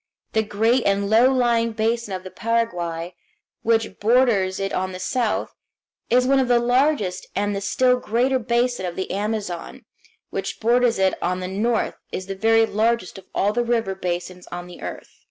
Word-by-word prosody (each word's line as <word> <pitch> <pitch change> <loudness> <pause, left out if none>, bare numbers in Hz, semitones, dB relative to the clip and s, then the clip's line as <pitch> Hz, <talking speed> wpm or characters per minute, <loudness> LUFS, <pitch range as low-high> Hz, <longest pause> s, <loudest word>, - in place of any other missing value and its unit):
The 220 - +3
great 225 +4 +1
and 200 +1 +1
low 240 +4 +6
lying 235 -3 +2
basin 225 -1 -1
of 185 - -7
the 185 - -9
Paraguay, 180 -7 -2 0.5
which 225 -3 0
borders 215 -5 +3
it 195 0 -2
on 185 0 -2
the 185 - -6
south, 235 +3 -1 0.6
is 250 +2 +4
one 270 +1 +4
of 260 - +1
the 245 -1 +4
largest, 240 -6 +1
and 205 0 0
the 200 - -3
still 250 +5 +2
greater 250 +4 +1
basin 235 -3 0
of 175 - -5
the 190 - -4
Amazon, 205 -3 -4 0.5
which - - -4
borders 240 +1 +3
it 190 -1 +3
on 180 +1 -1
the 185 - -4
north, 220 +5 -1
is 185 - -4
the 195 - -4
very 225 +3 +4
largest 220 -3 0
of 190 - -16
all 205 +2 +2
the 240 - +1
river 230 -4 0
basins 180 -1 -4
of 175 0 -6
the 180 0 -12
earth. - - -8
220 Hz, 180 wpm, -22 LUFS, 190-240 Hz, 0.6 s, low